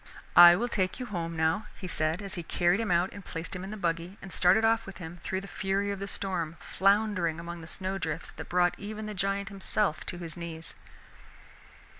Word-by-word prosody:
"I 175 0 +11
will 235 +7 0
take 190 -4 -1
you 255 - -3
home, 170 -6 -4
now," 160 +6 +1
he 185 - -6
said 160 +3 -1
as 195 - -5
he 175 - -3
carried 175 +3 +2
him 225 -3 -1
out 175 +1 +3
and 200 - -9
placed 165 0 -5
him 180 - -5
in 195 - -6
his 215 - -6
buggy, 170 +2 -2
and 195 - -9
started 190 +5 +5
off 225 -1 +2
with 195 -3 -8
him 175 0 -8
through 190 0 -2
the 200 - -9
fury 200 +1 -1
of 200 - -4
the 200 - -4
storm, 170 -5 -3
floundering 195 -5 +2
among 170 0 -6
the 160 - -10
snow 190 +2 -3
drifts 160 -1 -3
that - - -9
brought 175 0 +3
even 215 +1 -5
the 215 - -4
giant 195 0 -1
himself 195 -3 0
to 175 - -2
his 170 -3 -6
knees. 165 -2 -6
185 Hz, 220 wpm, -29 LUFS, 170-200 Hz, -, I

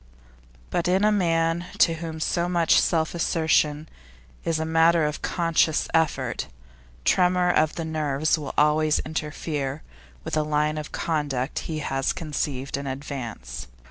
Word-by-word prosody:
But 175 0 0
in 185 +3 +2
a 215 - +5
man 165 -3 +1
to 165 - +5
whom 160 -1 -6
such 170 0 +2
self 160 -2 +1
assertion 160 -3 +1 0.6
is 165 -1 0
a 160 - -1
matter 165 0 +4
of 150 0 -3
conscious 165 -2 +1
effort, 160 -2 0 0.6
tremor 180 0 +3
of 155 -2 +2
the 165 - -3
nerves 155 -1 0
will 150 -3 -6
always 150 +1 +3
interfere 150 -2 -3 0.4
with - - -6
the 155 - +2
line 150 0 0
of 150 - -7
conduct 145 -5 -2
he 160 - -2
has 135 0 0
conceived 140 -4 -3
in 140 0 -5
advance. 130 - -6
155 Hz, 140 wpm, -25 LUFS, 150-165 Hz, 0.6 s, a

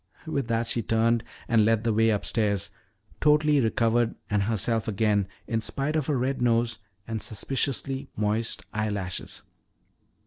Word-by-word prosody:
With 140 -6 -2
that 115 0 0
she 120 - 0
turned 115 +1 +2 0.2
and 115 -2 +4
led 110 0 +2
the 115 -1 +1
way 110 +1 +4
upstairs, 100 -2 0 0.5
totally 150 -1 +4
recovered 115 0 +2 0.2
and 105 -1 +2
herself 110 +1 0
again 105 -2 +1 0.2
in 115 -1 -1
spite 140 +6 -2
of 155 -2 0
a 145 - +2
red 130 +1 -1
nose 115 -1 +2 0.3
and 110 -1 -3
suspiciously 135 +4 -2
moist 105 +2 0
eyelashes. 105 -4 -3
115 Hz, 140 wpm, -27 LUFS, 110-125 Hz, 0.5 s, and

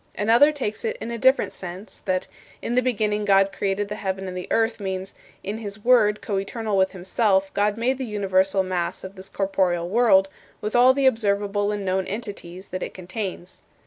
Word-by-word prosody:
Another 235 +8 +5
takes 260 -8 -4
it 460 +1 -2
in 235 - -5
a 235 - -3
different 260 +4 +3
sense, 185 +3 -8
that 185 -2 0 0.3
"In 235 - -3
the 250 - +4
beginning 210 -4 0
God 195 -1 +4
created 195 +1 -1
the 205 - -5
heaven 190 0 -3
and 180 - -6
the 180 - -5
earth" 225 0 +1
means, 190 -1 -4 0.3
"In 205 +3 -4
his 205 -1 -8
Word, 220 -4 +4
coeternal 205 +2 -2
with 190 0 +2
himself, 190 +1 +1
God 205 +1 +1
made 255 +3 0
the - - -2
universal 195 -3 +1
mass 180 -2 -3
of 190 +1 -8
this 190 0 -11
corporeal 185 -3 0
world, 195 -2 +4 0.3
with 210 +2 -4
all 250 +2 +6
the 275 -1 +1
observable 205 -3 +1
and 205 -1 -3
known 190 0 0
entities 200 -4 -7
that 185 - -5
it - - -5
contains." 185 0 -6
200 Hz, 190 wpm, -24 LUFS, 190-225 Hz, 0.3 s, all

